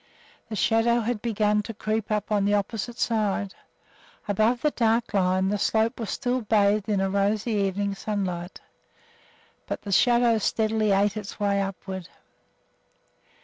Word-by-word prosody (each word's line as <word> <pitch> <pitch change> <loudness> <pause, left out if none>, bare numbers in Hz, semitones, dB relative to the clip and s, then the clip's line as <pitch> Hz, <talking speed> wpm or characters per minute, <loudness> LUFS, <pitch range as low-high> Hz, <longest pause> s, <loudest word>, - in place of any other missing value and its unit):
The 220 - -4
shadow 225 +4 +2
had 230 -1 -2
begun 210 -2 +1
to 220 +1 -8
creep 215 0 -2
up 215 0 -2
on 205 -1 +2
the 205 +1 +3
opposite 225 +3 -3
side. 205 -3 0 0.7
Above 220 +4 +1
the 300 - +3
dark 230 -1 +1
shadow 195 -2 +2
line 185 +1 +1
the 205 0 -1
slope 225 +4 +1
was 225 - -4
still 250 +1 -1
bathed 210 -1 +2
in 205 - +1
the 195 0 +1
rosy 200 +3 0
evening 200 -1 0
sunlight, 190 -3 -4 1.1
but - - -4
the 200 - -5
shadow 235 +3 +4
steadily 215 0 0
ate 200 +1 +2
its 210 0 -7
way 200 -1 +1
upward. 190 -2 -5
210 Hz, 150 wpm, -25 LUFS, 200-225 Hz, 1.1 s, shadow